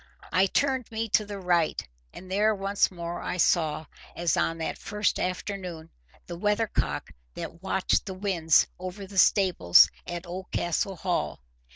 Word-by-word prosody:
I 185 Hz, +3 st, +4 dB
turned 260 Hz, +2 st, 0 dB
me 225 Hz, 0 st, -2 dB
to 210 Hz, +1 st, +3 dB
the 205 Hz, -1 st, -6 dB
right, 175 Hz, -, 0 dB, 0.2 s
and 185 Hz, +1 st, -11 dB
there 210 Hz, +2 st, +3 dB
once 195 Hz, 0 st, +1 dB
more 175 Hz, -1 st, -6 dB
I -, -, -3 dB
saw, 160 Hz, -3 st, +2 dB, 0.3 s
as 170 Hz, -2 st, +1 dB
on 165 Hz, -, 0 dB
that 160 Hz, -, -4 dB
first 210 Hz, 0 st, -1 dB
afternoon, 180 Hz, -3 st, -4 dB, 0.3 s
the 170 Hz, -1 st, -7 dB
weathercock 210 Hz, -, -1 dB, 0.2 s
that 170 Hz, -, -7 dB
watched 190 Hz, +1 st, 0 dB
the 190 Hz, -, -5 dB
winds 180 Hz, -5 st, +3 dB
over 185 Hz, +2 st, -6 dB
the 195 Hz, 0 st, -2 dB
stables 180 Hz, -, +5 dB, 0.2 s
at 175 Hz, +1 st, -5 dB
Oldcastle 180 Hz, +1 st, -2 dB
Hall. 180 Hz, +1 st, -2 dB
185 Hz, 150 wpm, -27 LUFS, 170-200 Hz, 0.3 s, stables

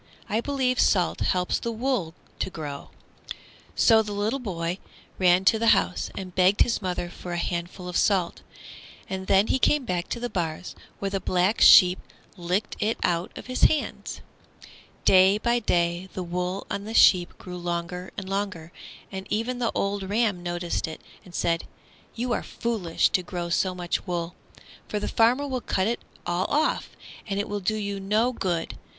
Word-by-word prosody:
I 220 Hz, +2 st, 0 dB
believe 260 Hz, -2 st, 0 dB
salt 180 Hz, -4 st, +3 dB
helps 180 Hz, -1 st, 0 dB
the 235 Hz, -, -3 dB
wool 225 Hz, -8 st, -1 dB, 0.2 s
to -, -, -1 dB
grow." 150 Hz, -5 st, -7 dB, 0.9 s
So 225 Hz, -2 st, +5 dB
the 210 Hz, +4 st, -2 dB
boy 180 Hz, -5 st, -3 dB, 0.4 s
ran 180 Hz, 0 st, +4 dB
to 220 Hz, +3 st, +5 dB
the 230 Hz, 0 st, +5 dB
house 180 Hz, -, -2 dB
and 185 Hz, -2 st, -6 dB
begged 185 Hz, +3 st, +3 dB
his 235 Hz, -, +2 dB
mother 180 Hz, -2 st, -2 dB
for 175 Hz, 0 st, -8 dB
a -, -, -2 dB
handful 175 Hz, +1 st, -4 dB
of 180 Hz, -, -6 dB
salt, 185 Hz, -4 st, +1 dB, 0.7 s
and 190 Hz, 0 st, -5 dB
then 195 Hz, +1 st, +5 dB
he 265 Hz, -, +1 dB
came 290 Hz, 0 st, +2 dB
back 180 Hz, -3 st, -2 dB
to -, -, -4 dB
the 245 Hz, -, -2 dB
bars, 175 Hz, -4 st, -3 dB, 0.2 s
where 195 Hz, -1 st, -3 dB
the 195 Hz, -, -1 dB
Black 185 Hz, +4 st, +1 dB
Sheep 180 Hz, 0 st, +8 dB, 0.4 s
licked 185 Hz, +3 st, -2 dB
it 215 Hz, +2 st, 0 dB
out 170 Hz, 0 st, 0 dB
of -, -, -8 dB
his 255 Hz, 0 st, +2 dB
hand. 310 Hz, -, -1 dB, 0.8 s
Day 190 Hz, +2 st, +6 dB
by 235 Hz, +2 st, +1 dB
day 175 Hz, -3 st, 0 dB
the 185 Hz, -, -4 dB
wool 180 Hz, +2 st, -3 dB
on 200 Hz, 0 st, -3 dB
the 220 Hz, +1 st, -5 dB
sheep 180 Hz, -3 st, +5 dB
grew 180 Hz, -1 st, -8 dB
longer 175 Hz, +1 st, -4 dB
and 195 Hz, -, -5 dB
longer, 195 Hz, -4 st, -3 dB, 0.4 s
and 190 Hz, 0 st, -6 dB
even 230 Hz, +4 st, -1 dB
the 235 Hz, -2 st, 0 dB
old 200 Hz, -1 st, -1 dB
ram 210 Hz, -4 st, +1 dB
noticed 175 Hz, -1 st, -2 dB
it 160 Hz, -, -7 dB, 0.2 s
and 175 Hz, -2 st, -13 dB
said, 165 Hz, -1 st, 0 dB, 0.5 s
"You 240 Hz, +1 st, -1 dB
are -, -, -1 dB
foolish 215 Hz, -8 st, 0 dB
to 185 Hz, -, +1 dB
grow 175 Hz, -1 st, -5 dB
so 185 Hz, +2 st, +1 dB
much 175 Hz, -1 st, -3 dB
wool, 175 Hz, -1 st, -3 dB, 0.5 s
for 210 Hz, -, -2 dB
the -, -, -3 dB
farmer 245 Hz, +5 st, +3 dB
will 260 Hz, -2 st, -2 dB
cut 190 Hz, -, 0 dB
it 235 Hz, +3 st, -1 dB, 0.3 s
all 175 Hz, +2 st, 0 dB
off, 305 Hz, +2 st, 0 dB, 0.4 s
and 200 Hz, -1 st, -2 dB
it 205 Hz, -, -2 dB
will 205 Hz, 0 st, -3 dB
do 210 Hz, +3 st, -1 dB
you 200 Hz, -2 st, -3 dB
no 215 Hz, +6 st, +1 dB
good. 175 Hz, -7 st, -2 dB
190 Hz, 180 wpm, -26 LUFS, 175-220 Hz, 0.9 s, Sheep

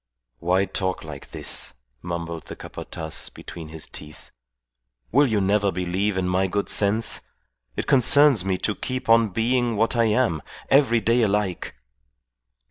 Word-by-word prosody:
"Why 90 Hz, +5 st, +2 dB
talk 95 Hz, 0 st, -2 dB
like 75 Hz, -3 st, -9 dB
this?" -, -, -1 dB, 0.3 s
mumbled 85 Hz, -2 st, -5 dB
the -, -, -7 dB
Capataz 80 Hz, -1 st, -5 dB
between 80 Hz, -2 st, -10 dB
his 80 Hz, 0 st, -7 dB
teeth. 75 Hz, +1 st, -11 dB, 0.8 s
"Will 140 Hz, +4 st, +5 dB
you 110 Hz, -4 st, +1 dB
never 100 Hz, +1 st, +2 dB
believe 95 Hz, +3 st, -1 dB
in 90 Hz, -1 st, 0 dB
my 95 Hz, +1 st, +1 dB
good 100 Hz, +2 st, -2 dB
sense? 105 Hz, +2 st, +1 dB, 0.5 s
It -, -, -2 dB
concerns 140 Hz, -3 st, +5 dB
me 95 Hz, -1 st, 0 dB
to 105 Hz, -, 0 dB
keep 130 Hz, +3 st, -5 dB
on 115 Hz, -1 st, +5 dB
being 120 Hz, +3 st, 0 dB
what 115 Hz, +3 st, +1 dB
I 115 Hz, -1 st, +3 dB
am: 110 Hz, -8 st, +1 dB, 0.3 s
every 130 Hz, -5 st, +4 dB
day 115 Hz, +2 st, +2 dB
alike." 100 Hz, -, -1 dB
100 Hz, 145 wpm, -24 LUFS, 90-115 Hz, 0.8 s, Will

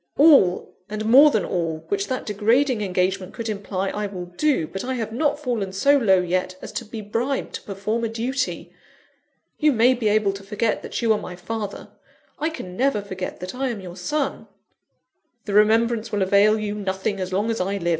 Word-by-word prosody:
"All, 280 Hz, -, +5 dB
and 215 Hz, +1 st, -4 dB
more 270 Hz, +7 st, +8 dB
than 215 Hz, -9 st, 0 dB
all, 165 Hz, -3 st, -2 dB
which 400 Hz, 0 st, -1 dB
that 260 Hz, -1 st, -3 dB
degrading 225 Hz, +4 st, +2 dB
engagement 185 Hz, -1 st, -1 dB
could 230 Hz, -, -4 dB
imply, 195 Hz, -2 st, -3 dB
I 210 Hz, +1 st, -3 dB
will 185 Hz, -3 st, -6 dB
do. 180 Hz, -, 0 dB
But 195 Hz, +5 st, -6 dB
I 260 Hz, +1 st, -2 dB
have 225 Hz, -3 st, -3 dB
not 290 Hz, +4 st, +1 dB
fallen 235 Hz, -9 st, -2 dB
so 280 Hz, +10 st, +3 dB
low 200 Hz, -9 st, +4 dB
yet, 185 Hz, +1 st, -1 dB
as -, -, -8 dB
to 235 Hz, -, -4 dB
be 220 Hz, +1 st, -7 dB
bribed 235 Hz, +6 st, -2 dB
to -, -, -5 dB
perform 210 Hz, +4 st, -3 dB
a 230 Hz, -, 0 dB
duty. 255 Hz, +4 st, -3 dB, 0.9 s
You 305 Hz, -1 st, +4 dB
may 245 Hz, +1 st, +4 dB
be 235 Hz, -3 st, -1 dB
able 210 Hz, -1 st, +2 dB
to 195 Hz, -, -8 dB
forget 210 Hz, +2 st, -1 dB
that -, -, -5 dB
you 225 Hz, -1 st, +4 dB
are 210 Hz, -, -1 dB
my 180 Hz, -, -7 dB
father; 205 Hz, +3 st, -5 dB, 0.5 s
I 310 Hz, -, 0 dB
can 185 Hz, -, -8 dB
never 255 Hz, -3 st, +1 dB
forget 190 Hz, -2 st, -6 dB
that 180 Hz, +1 st, -5 dB
I 265 Hz, +1 st, -2 dB
am 230 Hz, -4 st, -4 dB
your 180 Hz, -2 st, -9 dB
son." 275 Hz, +10 st, -2 dB, 1.0 s
"The 205 Hz, -, -4 dB
remembrance 225 Hz, +2 st, +3 dB
will 205 Hz, -2 st, +1 dB
avail 200 Hz, +3 st, +4 dB
you 210 Hz, -1 st, -3 dB
nothing 195 Hz, 0 st, -2 dB
as 185 Hz, 0 st, -3 dB
long 205 Hz, +5 st, 0 dB
as 225 Hz, -, -2 dB
I 195 Hz, +2 st, -1 dB
live. 175 Hz, -3 st, -2 dB
210 Hz, 205 wpm, -23 LUFS, 190-240 Hz, 1.0 s, more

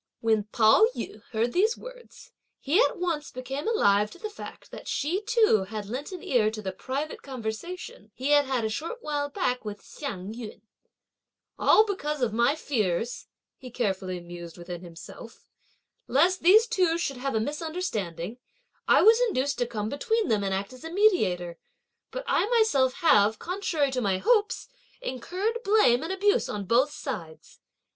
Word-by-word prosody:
When 220 Hz, -2 st, +1 dB
Pao 220 Hz, -, +5 dB
yü -, -, -6 dB
heard 230 Hz, +1 st, -1 dB
these 430 Hz, +6 st, +2 dB
words, -, -, -13 dB, 0.3 s
he 320 Hz, -, +3 dB
at -, -, +2 dB
once 340 Hz, -4 st, -2 dB
became 270 Hz, -, -5 dB
alive 210 Hz, -, +3 dB
to -, -, -13 dB
the 430 Hz, +4 st, -6 dB
fact 415 Hz, -, -10 dB
that -, -, -10 dB
she 340 Hz, +7 st, -1 dB
too 430 Hz, -, +3 dB
had 215 Hz, -1 st, -5 dB
lent 255 Hz, -, -5 dB
an 365 Hz, -3 st, -7 dB
ear 225 Hz, -5 st, +2 dB
to 215 Hz, 0 st, -6 dB
the 190 Hz, -, -2 dB
private 270 Hz, +10 st, -4 dB
conversation 250 Hz, -, -6 dB
he 265 Hz, +3 st, -1 dB
had 290 Hz, -1 st, +5 dB
had 260 Hz, -4 st, -1 dB
a -, -, +2 dB
short 330 Hz, -, -5 dB
while 290 Hz, -1 st, -2 dB
back 280 Hz, -8 st, -1 dB
with 210 Hz, -2 st, -6 dB
Hsiang 205 Hz, -8 st, -6 dB
yün: 225 Hz, -3 st, -9 dB, 1.0 s
"All 430 Hz, -, +6 dB
because 300 Hz, -8 st, -3 dB
of 225 Hz, -3 st, 0 dB
my, 235 Hz, +6 st, +3 dB
fears," 225 Hz, -, -2 dB, 0.3 s
he 255 Hz, -, -10 dB
carefully 190 Hz, -6 st, -2 dB
mused 175 Hz, -1 st, -10 dB
within 175 Hz, 0 st, -7 dB
himself, 170 Hz, +6 st, -12 dB, 0.6 s
"lest 350 Hz, +7 st, +3 dB
these 420 Hz, +6 st, +7 dB
two 370 Hz, -8 st, +1 dB
should 275 Hz, -6 st, -2 dB
have 270 Hz, 0 st, -3 dB
a -, -, +3 dB
misunderstanding, 240 Hz, -, -4 dB, 0.5 s
I -, -, +5 dB
was 450 Hz, +3 st, +6 dB
induced 275 Hz, -, -1 dB
to 245 Hz, -, +1 dB
come 210 Hz, -3 st, -3 dB
between 445 Hz, -, 0 dB
them, 210 Hz, -2 st, +2 dB
and 195 Hz, -, -1 dB
act 195 Hz, +5 st, -3 dB
as 255 Hz, -, -13 dB
a 325 Hz, -, -6 dB
mediator; 185 Hz, -, +2 dB, 0.5 s
but -, -, -5 dB
I -, -, +2 dB
myself 435 Hz, -, +3 dB
have, 215 Hz, -7 st, +5 dB
contrary 335 Hz, -, -1 dB
to 255 Hz, -1 st, -1 dB
my 195 Hz, -4 st, +1 dB
hopes, 445 Hz, -, +1 dB, 0.3 s
incurred 385 Hz, -, -3 dB
blame 395 Hz, -, +4 dB
and 325 Hz, -, -4 dB
abuse 405 Hz, +5 st, +2 dB
on 205 Hz, -1 st, -4 dB
both 245 Hz, +8 st, +3 dB
sides! 180 Hz, -, -7 dB
265 Hz, 170 wpm, -27 LUFS, -, 1.0 s, these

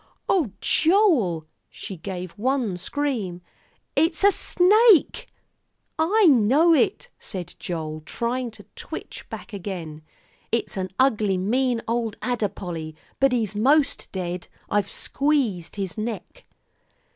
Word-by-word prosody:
"Oh, 335 Hz, -, +2 dB
Joel!" 310 Hz, -, +3 dB, 0.2 s
She 195 Hz, -, -8 dB
gave 180 Hz, 0 st, -6 dB
one 245 Hz, -2 st, -1 dB
scream, 200 Hz, -5 st, -3 dB, 0.5 s
"It's 320 Hz, +4 st, +2 dB
a 405 Hz, -, +7 dB
snake!" 405 Hz, +1 st, +4 dB, 0.7 s
"I 400 Hz, +7 st, +4 dB
know 285 Hz, +4 st, +5 dB
it," 420 Hz, +7 st, +1 dB
said 180 Hz, -2 st, -7 dB
Joel, 155 Hz, -3 st, -4 dB
trying 240 Hz, +7 st, -2 dB
to 220 Hz, -2 st, -13 dB
twitch -, -, -8 dB
back -, -, -9 dB
again; 175 Hz, -6 st, -6 dB, 0.5 s
"it's 230 Hz, -, -1 dB
an 185 Hz, -1 st, -3 dB
ugly 215 Hz, -7 st, +2 dB
mean 240 Hz, +5 st, 0 dB
old 230 Hz, -2 st, -1 dB
adder, 240 Hz, -5 st, -1 dB
Polly, 165 Hz, -4 st, -6 dB, 0.2 s
but 270 Hz, -1 st, +4 dB
he's 225 Hz, -5 st, 0 dB
most 275 Hz, +7 st, +2 dB
dead. 180 Hz, -1 st, -4 dB, 0.2 s
I've 205 Hz, -1 st, +1 dB
squeezed 260 Hz, -, 0 dB
his 195 Hz, 0 st, -4 dB
neck." 230 Hz, -, -6 dB
225 Hz, 120 wpm, -24 LUFS, 185-285 Hz, 0.7 s, a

